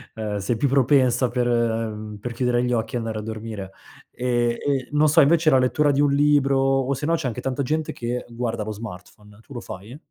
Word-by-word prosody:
ehm, 105 Hz, -2 st, -3 dB
sei 110 Hz, +4 st, -1 dB
più 140 Hz, -, +1 dB
propensa 130 Hz, -2 st, +3 dB
per, 120 Hz, 0 st, 0 dB
ehm, 110 Hz, -3 st, -1 dB
per 120 Hz, +3 st, -5 dB
chiudere 125 Hz, 0 st, +1 dB
gli 125 Hz, -, 0 dB
occhi 115 Hz, +1 st, -2 dB
e -, -, +1 dB
andare 115 Hz, -2 st, -3 dB
a -, -, -5 dB
dormire. 110 Hz, -3 st, -6 dB, 0.4 s
Ehm, 120 Hz, -1 st, 0 dB
e 135 Hz, -3 st, -1 dB
non 150 Hz, +1 st, +3 dB
so 150 Hz, -, +5 dB
invece 160 Hz, +2 st, +4 dB
la 135 Hz, -, +5 dB
lettura 145 Hz, +3 st, +2 dB
di 140 Hz, +1 st, +1 dB
un 145 Hz, -1 st, +3 dB
libro, 140 Hz, -1 st, +3 dB
o 135 Hz, 0 st, +1 dB
se 145 Hz, +3 st, -4 dB
no 165 Hz, +1 st, +2 dB
c'è 155 Hz, -5 st, -3 dB
anche 125 Hz, +1 st, -4 dB
tanta 135 Hz, +2 st, -2 dB
gente 155 Hz, +3 st, -2 dB
che 120 Hz, +1 st, -4 dB
guarda 115 Hz, -2 st, -3 dB
lo 110 Hz, -, -4 dB
smartphone. 105 Hz, 0 st, -11 dB
Tu 135 Hz, -, -15 dB
lo 120 Hz, -, -6 dB
fai? 105 Hz, +8 st, -9 dB
125 Hz, 225 wpm, -23 LUFS, 110-140 Hz, 0.4 s, so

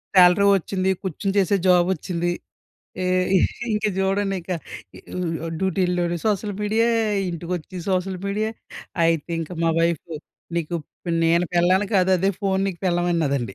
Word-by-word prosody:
Salary 180 Hz, +2 st, +7 dB
ఒచ్చింది. 190 Hz, +1 st, -1 dB
కూర్చొని 195 Hz, +1 st, -2 dB
చేసే 195 Hz, +1 st, +2 dB
జాబొచ్చింది. 175 Hz, -1 st, +2 dB, 0.7 s
ఏ -, -, -1 dB, 0.7 s
ఇంక 210 Hz, -, -2 dB
చూడండి 195 Hz, 0 st, +1 dB
ఇక 175 Hz, -, -11 dB, 1.0 s
ఉ -, -, -3 dB
డ్యూటీల్లోని 180 Hz, -2 st, 0 dB
సోషల్ 205 Hz, -1 st, 0 dB
మీడియే, 220 Hz, +3 st, +2 dB, 0.4 s
ఇంటికొచ్చి 175 Hz, +1 st, -5 dB
సోషల్ 185 Hz, 0 st, 0 dB
మీడియే 210 Hz, +2 st, -1 dB, 0.5 s
అయితే 165 Hz, 0 st, +1 dB
ఇంక 160 Hz, -, -6 dB
మా 165 Hz, -, +3 dB
వైఫ్ 170 Hz, -1 st, +1 dB, 0.5 s
నీకు 170 Hz, 0 st, -2 dB, 0.5 s
నేను 170 Hz, +2 st, +3 dB
పెళ్ళాన్ని 185 Hz, +3 st, +3 dB
కాదు 190 Hz, 0 st, +4 dB
అదే 195 Hz, +3 st, +2 dB
ఫోన్ 195 Hz, -1 st, +1 dB
నీకు 180 Hz, -3 st, -6 dB
పెళ్ళాం 175 Hz, -1 st, +1 dB
అన్నాదండి. 140 Hz, -, -1 dB
180 Hz, 130 wpm, -23 LUFS, 170-195 Hz, 1.0 s, Salary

